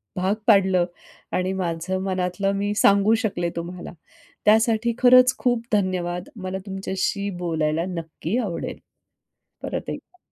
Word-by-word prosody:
भाग 190 +3 +1
पाडलं. 190 -4 +5 0.5
आणि 185 +1 0
माझं 180 0 -2
मनातलं 185 +1 -1
मी 205 +1 -1
सांगू 200 +1 +4
शकले 175 -5 -1
तुम्हाला. 175 +1 -6 0.5
त्यासाठी 225 +2 +3
खरंच 255 0 +6
खूप 245 -2 +1
धन्यवाद. 180 -3 -1
मला 190 -1 -4
तुमच्याशी 195 +1 -2
बोलायला 160 -2 0
नक्की 165 +3 -4
आवडेल, 200 -9 -3 0.8
परत - - -4
एकदा. 365 - -9
190 Hz, 115 wpm, -23 LUFS, 175-210 Hz, 0.8 s, खरंच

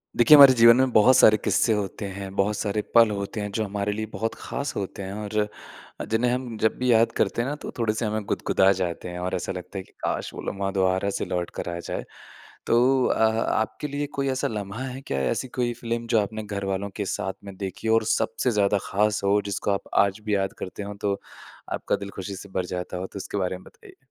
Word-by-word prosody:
देखिए, 120 +6 +8
हमारे 140 -2 +10
जीवन 115 -1 +7
में 130 0 +3
बहुत 120 +4 +6
सारे 110 -4 +7
किस्से 110 +2 +2
होते 105 0 -3
हैं, 95 0 -7
बहुत 100 +2 +1
सारे 105 0 -1
पल 115 -1 +7
होते 100 +1 -4
हैं, 105 0 -4
जो 110 +2 -1
हमारे 100 0 -2
लिए 110 +1 -3
बहुत 115 +1 -3
ख़ास 140 - -5
होते 100 0 -4
हैं 95 +1 -6
और 105 0 0 0.6
जिन्हें 120 +2 +2
हम 125 -2 -3
जब 110 +1 +1
भी 125 0 +1
याद 115 0 +4
करते 105 +3 +1
हैं 125 - -2
ना, 145 - -2
तो - - -8
थोड़े-से 110 0 0
हमें 110 0 -2
गुदगुदा 95 0 +2
जाते 90 -2 -2
हैं 90 0 -6
और 90 +1 -2
ऐसा 90 - -3
लगता 95 +1 -7
है 95 - -4
कि - - -24
काश! - - -2
वो - - -7
लम्हा 100 0 -3
दोबारा 95 0 +1
से - - -2
लौटकर 90 -1 -3
आ - - -5
जाए। - - -5 0.6
तो 125 +2 +4
अ - - +1 0.4
आपके 110 +6 -2
लिए 145 0 -3
कोई 140 0 0
ऐसा 130 -1 0
लम्हा 105 +2 -5
है 130 0 -6
क्या, 70 - -3
ऐसी 65 - -1
कोई 120 -1 -1
फ़िल्म 115 0 -4
जो 115 -1 +3
आपने 110 +2 -4
घरवालों 100 -1 -3
के 100 - -2
साथ 95 0 -2
में 100 - -8
देखी 95 +3 -5
और 115 - +1
सबसे 115 +2 0
ज़्यादा 100 -2 +2
ख़ास 105 +1 +1
हो, 100 +1 +3
जिसको 100 0 -1
आप 100 - -1 0.2
आज 100 +1 -4
भी 105 -1 +1
याद 95 -1 -1
करते 95 +2 -6
हों, 100 0 -6
तो 100 -1 -1 0.5
आपका - - -1
दिल 100 0 -7
खुशी 100 +1 -5
से 100 +1 -10
भर 95 -1 -2
जाता 90 0 -5
हो? 95 - -4
तो - - -10
इसके 100 - -5
बारे 95 -1 -1
में 95 - -16
बताइए। 405 -5 -16
105 Hz, 230 wpm, -25 LUFS, 95-115 Hz, 0.6 s, हमारे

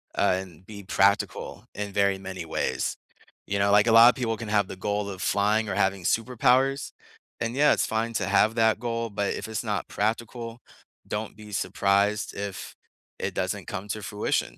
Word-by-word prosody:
uh, 90 - +3
and 90 -2 -13
be 100 0 -10
practical 100 +1 +1
in 105 -1 -4
very 100 -1 +2
many 95 -2 -7
ways. - - -2 0.5
You 100 0 -1
know, 100 0 +3
like, 105 +2 +5
a - - +4
lot 115 +1 +9
of - - +1
people 115 -3 -2
can 115 - -6
have 105 -2 +2
the - - -7
goal 105 +2 -2
of 95 -2 -7
flying 105 +3 +1
or - - -2
having 95 -1 +1
superpowers, 125 +6 +2 0.5
and, 115 +2 -2
yeah, 150 +2 +5
it's - - +1
fine 115 +1 -1
to 100 -4 -1
have 105 +3 +3
that 110 -2 +3
goal, 115 -1 -2
but 100 -1 -1
if - - -5
it's 110 -1 -3
not - - -2
practical, 115 +2 -3 0.5
don't 105 0 -4
be 105 -1 -12
surprised 100 +1 +1
if 100 -1 -6 0.4
it - - -2
doesn't - - -2
come 100 - -5
to 110 +1 -3
fruition. 105 +2 -2
105 Hz, 190 wpm, -26 LUFS, 100-115 Hz, 0.5 s, lot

